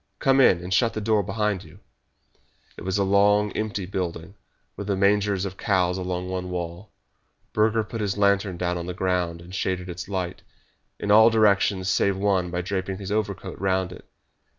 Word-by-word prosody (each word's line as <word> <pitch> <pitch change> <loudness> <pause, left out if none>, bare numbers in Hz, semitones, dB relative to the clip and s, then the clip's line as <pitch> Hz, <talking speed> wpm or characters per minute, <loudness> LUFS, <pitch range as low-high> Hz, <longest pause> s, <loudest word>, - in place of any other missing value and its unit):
Come 135 -1 +3
in, 90 -8 +4
and 90 +1 -3
shut 115 +3 +3
the - - -1
door 110 0 +2
behind 100 -1 -1
you." 80 +3 -16 1.0
It - - -11
was 95 +2 -1
a 100 - +2
long, 105 +1 +3
empty 105 -3 -3
building, 90 -1 -4 0.4
with 100 - -6
the 100 - +1
mangers 100 0 +2
of 95 -1 -6
the - - -12
cows 90 -3 +2
along 90 0 -3
one 90 0 -4
wall. 90 +2 -5 0.6
Burger 110 +1 +2
put 115 +1 -6
his 100 -1 -1
lantern 100 -2 +2
down 90 0 -1
on 85 - -6
the 90 - -4
ground, 90 -2 -1
and 90 +2 -12
shaded 95 -1 -2
its 90 +2 -7
light 90 -3 -3 0.6
in 105 - -1
all 110 +2 +8
directions 100 -4 +2
save 100 0 +2
one 95 -3 +1
by 90 0 -2
draping 95 +1 -3
his 100 0 -6
overcoat 100 -3 -3
round 95 -2 0
it. 90 - -13
95 Hz, 190 wpm, -25 LUFS, 90-105 Hz, 1.0 s, all